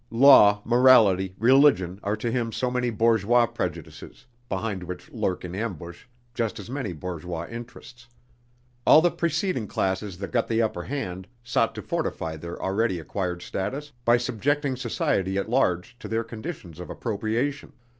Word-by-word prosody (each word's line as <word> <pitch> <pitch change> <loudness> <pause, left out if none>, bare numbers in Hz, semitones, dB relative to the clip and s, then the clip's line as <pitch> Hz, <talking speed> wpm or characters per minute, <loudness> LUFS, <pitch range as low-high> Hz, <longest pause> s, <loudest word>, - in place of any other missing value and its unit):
Law, 115 -5 +7
morality, 110 -7 +5
religion, 115 -7 +4
are 100 +1 -1
to 115 +2 -2
him 115 -2 -1
so 125 +2 -2
many 125 -1 0
bourgeois 115 +1 +3
prejudices, 110 -8 -6 0.2
behind 95 0 -3
which 90 0 -8
lurk 90 -1 -2
in 90 - -7
ambush 90 -4 -6 0.3
just 115 -3 -2
as 105 +3 -9
many 130 -8 -3
bourgeois 85 0 -5
interests. 120 +1 -10 0.8
All 155 - +8
the 175 - +4
preceding 170 - -1
classes 95 0 -2
that 100 +1 -6
got 120 -2 +1
the 115 0 0
upper 110 -6 -1
hand, 95 -9 -5 0.2
sought 120 -1 0
to - - -6
fortify 80 -1 -3
their 85 +2 -8
already 95 0 0
acquired 90 +1 -4
status 135 +10 -4
by 120 0 +5
subjecting 130 +4 -1
society 95 -6 -1
at 100 +3 -2
large 90 -5 +1
to - - -8
their 115 +1 -1
conditions 110 - -8
of 90 - -8
appropriation. 120 +6 -2
110 Hz, 155 wpm, -25 LUFS, 95-125 Hz, 0.8 s, All